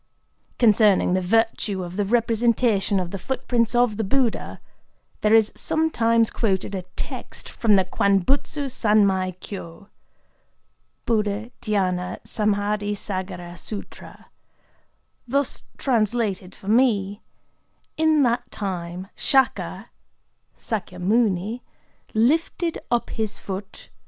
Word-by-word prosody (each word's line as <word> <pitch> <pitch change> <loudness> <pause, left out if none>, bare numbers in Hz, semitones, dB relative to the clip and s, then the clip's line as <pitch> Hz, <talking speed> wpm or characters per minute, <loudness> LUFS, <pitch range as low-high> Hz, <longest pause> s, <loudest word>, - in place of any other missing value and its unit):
Concerning 210 -5 +4
the 185 - +2
virtue 210 -1 +1
of 175 0 -7
the 205 0 0
representation 230 -2 +2
of 180 -1 -4
the 195 - -5
footprints 245 0 0
of 240 -3 +3
the 225 - 0
Buddha, 240 +3 0 0.6
there 215 +1 +5
is 220 -1 +4
sometimes 230 -8 +2
quoted 200 -3 -1
a 190 - -2
text - - -6
from 220 -3 +2
the 190 -1 +3
Kwan 200 +2 +2
butsu 280 - 0
sanmai 200 -6 +2
kyō 190 0 -9 1.2
["Buddha 215 0 0
dhyâna 185 -4 -1
samâdhi 205 -1 0
sâgara 185 -3 -5
sûtra"], 200 +4 -9 1.0
thus 280 +2 -1
translated 215 -6 0
for 195 - -14
me:—"In 240 +7 0
that 240 0 0
time 180 -2 -5
Shaka 265 -1 +1 0.7
["Sâkyamuni"] 205 +2 0 0.5
lifted 325 +8 +1
up 240 -1 0
his 220 -2 -3
foot…. 195 +1 -7
210 Hz, 100 wpm, -23 LUFS, 190-235 Hz, 1.2 s, there